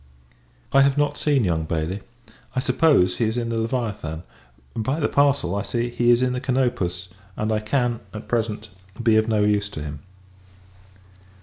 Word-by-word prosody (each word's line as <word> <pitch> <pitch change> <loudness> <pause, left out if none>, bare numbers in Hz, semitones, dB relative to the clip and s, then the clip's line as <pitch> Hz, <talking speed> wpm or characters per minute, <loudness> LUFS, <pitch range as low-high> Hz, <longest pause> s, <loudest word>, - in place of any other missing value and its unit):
I 135 - +7
have 140 0 +3
not 145 0 +1
seen 145 -5 +2
young 80 -4 0
Bailey: 80 +5 -2 0.5
I - - +2
suppose, 125 - +3
he 115 - +1
is 110 +2 -1
in 120 -1 -1
the 115 - -1
Leviathan. 110 -9 -3 0.5
By 130 +7 -1
the 145 - +2
parcel, 140 -11 +2
I 100 - 0
see, 120 +2 -2
he 120 0 +1
is 120 +1 +5
in 125 0 +1
the 125 - -3
Canopus; 120 -10 -1 0.3
and 110 +1 -1
I 110 - +1
can, 120 +1 0
at 110 - -8
present, 110 -2 -2 0.3
be 115 -2 +4
of 110 +1 +3
no 110 -2 +2
use 105 -1 +1
to 75 -7 -6
him. 75 -1 -6
115 Hz, 180 wpm, -23 LUFS, 100-125 Hz, 0.5 s, I